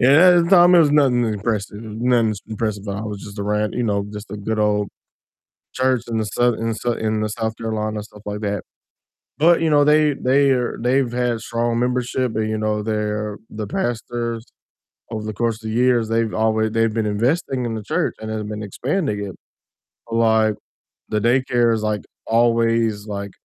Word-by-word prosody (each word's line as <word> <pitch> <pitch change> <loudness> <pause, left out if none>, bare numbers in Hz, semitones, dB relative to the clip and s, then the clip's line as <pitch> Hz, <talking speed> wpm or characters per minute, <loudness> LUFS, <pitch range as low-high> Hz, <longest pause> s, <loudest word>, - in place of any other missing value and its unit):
yeah, 145 +8 +7
at 170 - +3
the - - -3
time 175 -1 +7
it - - +7
was 150 -3 +4
nothing 130 -5 +4
impressive, 105 -1 -2
it - - -8
was 105 +1 -7
nothing 120 -3 +2
impressive 110 -2 -3
about 100 0 -3
it, - - -4
it - - -3
was 100 -1 -6
just 105 0 -10
a - - -2
ran 105 +1 0
you 125 - -2
know, 100 -3 0
just 105 -1 -8
a 105 - -5
good 110 +2 -3
old 105 -1 +1 0.8
church 130 -2 +1
in 115 - -1
the 110 - 0
Sou 120 +3 +1
in 115 +1 -3
the - - -1
Sou 120 +1 -1
in 110 -1 -1
the 105 - 0
South 110 0 -3
Carolina, 110 -1 -3
stuff 105 -1 -14
like 105 0 -4
that, 100 -2 -2 0.7
but, 170 +2 +4
you 160 - +2
know, 145 -1 +5
they 150 -1 +4
they 135 +2 +2
are 125 -2 0
they've 125 0 +1
had 120 -1 0
strong 115 +1 -1
membership 125 -1 -1
and, 110 0 0
you 110 - -1
know, 105 -1 -1
their 105 -1 -2
the 110 -1 -5
pastors 120 - -3 0.7
over 110 -1 -4
the 110 - -4
course 115 +1 -1
of 110 - -17
the - - -3
years 120 -3 +3
they've 115 -1 0
alway 110 0 +1
they've 115 0 +1
been 110 -2 0
investing 125 +5 0
in 115 - -3
the 110 - -5
church 105 - -1
and 110 0 -6
have 110 -1 -3
been 105 0 -5
expanding 120 - -2
it, 95 -3 -7 0.8
like, 110 -2 +3 0.5
the 105 - 0
daycare 120 0 +2
is, 110 -1 -2
like, 105 -1 -1 0.2
always, 115 -2 +2
like, 100 -1 -5
110 Hz, 205 wpm, -21 LUFS, 105-125 Hz, 0.8 s, yeah